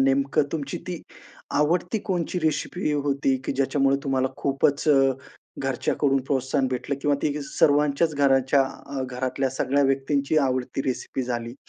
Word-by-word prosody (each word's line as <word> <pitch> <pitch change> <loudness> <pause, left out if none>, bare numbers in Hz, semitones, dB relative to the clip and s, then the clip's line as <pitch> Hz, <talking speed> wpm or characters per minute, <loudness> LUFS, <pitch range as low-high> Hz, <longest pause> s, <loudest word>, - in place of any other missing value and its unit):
नेमकं 135 +2 +2
तुमची 145 -4 -3
ती 175 -3 -4 0.6
आवडती 175 +7 +1
कोणची 180 -1 -1
रेसिपी 155 +2 -1
होती? 140 -2 +1
की - - -1
ज्याच्यामुळे 135 0 +2
तुम्हाला 130 -1 +1
खूपच 140 +2 +1
अ, 135 -2 +5 0.5
घरच्याकडून 135 +1 +1
प्रोत्साहन 135 0 0
भेटलं 130 +2 -3
किंवा 145 0 +2
ती 150 - +1
सर्वांच्याच 145 +2 +2
घराच्या, 135 -1 +3 0.2
अ, 140 -1 -4
घरातल्या 130 +1 -2
सगळ्या 135 +2 +1
व्यक्तींची 140 +2 +1
आवडती 130 +1 -2
रेसिपी 130 +1 -2
झाली 120 -1 -4
140 Hz, 135 wpm, -25 LUFS, 135-145 Hz, 0.6 s, अ